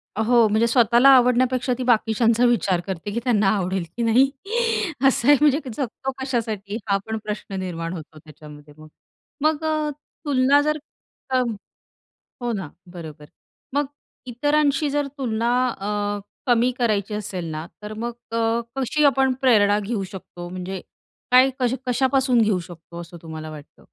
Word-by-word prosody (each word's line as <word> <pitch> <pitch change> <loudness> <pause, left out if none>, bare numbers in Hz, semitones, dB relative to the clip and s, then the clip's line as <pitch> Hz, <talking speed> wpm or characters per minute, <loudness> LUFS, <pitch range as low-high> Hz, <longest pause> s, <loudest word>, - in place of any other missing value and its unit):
हो, 225 +1 +4
म्हणजे 220 +2 +2
स्वतःला 240 +2 +5
आवडण्यापेक्षा 250 0 +3
ती 255 - -3
बाकीच्यांचा 230 0 +3
विचार 200 -7 +2
करते 190 +2 -4
की 235 - -1
त्यांना 215 -6 +2
आवडेल 185 -1 -1
की 235 - 0
नाही. 250 +4 +4 0.8
असं 255 -1 +1
आहे. 290 - +8
म्हणजे 295 0 +4 0.2
जगतो 270 0 -3
कशासाठी 220 -5 -3
हा 200 0 +3
पण 220 0 -2
प्रश्न 210 -2 -5
निर्माण 170 -2 -4
होतो 155 -2 -9
त्याच्यामध्ये 150 -1 -14
मग. 155 0 -13 0.5
मग 310 0 +1
अ, 310 -1 0 0.4
तुलना 280 +1 +4
जर 305 +1 0 0.5
अ, 260 -1 +2 1.0
हो 240 -1 -1
ना. 190 -7 -4 0.3
बरोबर. 155 -3 -9 0.5
मग 290 0 +1 0.4
इतरांशी 290 +3 +1
जर 290 0 -1
तुलना 235 -3 -1 0.2
अ, 205 -2 -2 0.3
कमी 245 +1 +3
करायची 210 -4 0
असेल 190 -4 -4
ना, 155 +1 -5 0.2
तर 210 +1 -7
मग 235 +2 -4 0.2
अ, 230 +1 +1
कशी 270 +3 0
आपण 270 -2 +3
प्रेरणा 210 -5 +4
घेऊ 210 0 -3
शकतो? 185 -2 -9
म्हणजे 185 +1 -6 0.5
काय 255 +1 +7
कशा 250 0 +1
कशापासून 260 -1 +2
घेऊ 210 -4 +2
शकतो 170 0 -10
असं 170 +1 -11
तुम्हाला 160 -1 -7
वाटतं? 150 -1 -12
225 Hz, 150 wpm, -23 LUFS, 190-255 Hz, 1.0 s, आहे